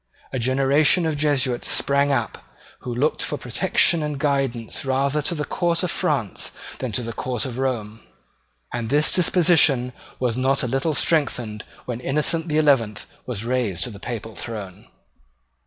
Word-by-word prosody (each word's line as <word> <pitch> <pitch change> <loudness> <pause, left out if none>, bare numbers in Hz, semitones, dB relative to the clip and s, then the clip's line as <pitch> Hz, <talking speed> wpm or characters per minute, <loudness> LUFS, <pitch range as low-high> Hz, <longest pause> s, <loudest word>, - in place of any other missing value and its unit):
A 130 - -1
generation 135 +7 +3
of 160 -2 0
Jesuits 140 -4 +1
sprang 140 +1 +2
up, 120 -5 -2 0.4
who 125 - -6
looked 135 +6 0
for 150 - -2
protection 170 +6 +2
and 150 -1 -3
guidance 135 -5 -1
rather 140 +2 +1
to 170 +4 -1
the 150 -2 -2
court 170 +2 0
of 180 - 0
France 140 - -1 0.3
than 130 -3 -3
to 125 - +1
the 115 0 -5
court 125 -1 -3
of 130 -1 -5
Rome; 115 -5 -2 0.7
and 115 -2 -3
this 150 +3 +3
disposition 160 -8 +4 0.3
was 125 -3 0
not 135 +2 +1
a - - 0
little 135 +5 0
strengthened 125 -10 0 0.2
when 120 -2 -4
Innocent 150 +5 0
the 155 -1 0
Eleventh 130 -9 +2 0.2
was 115 -3 -3
raised 120 -7 0
to 125 - -3
the 100 - -10
papal 110 -1 -6
throne. 105 -6 -7
135 Hz, 160 wpm, -23 LUFS, 120-150 Hz, 0.7 s, disposition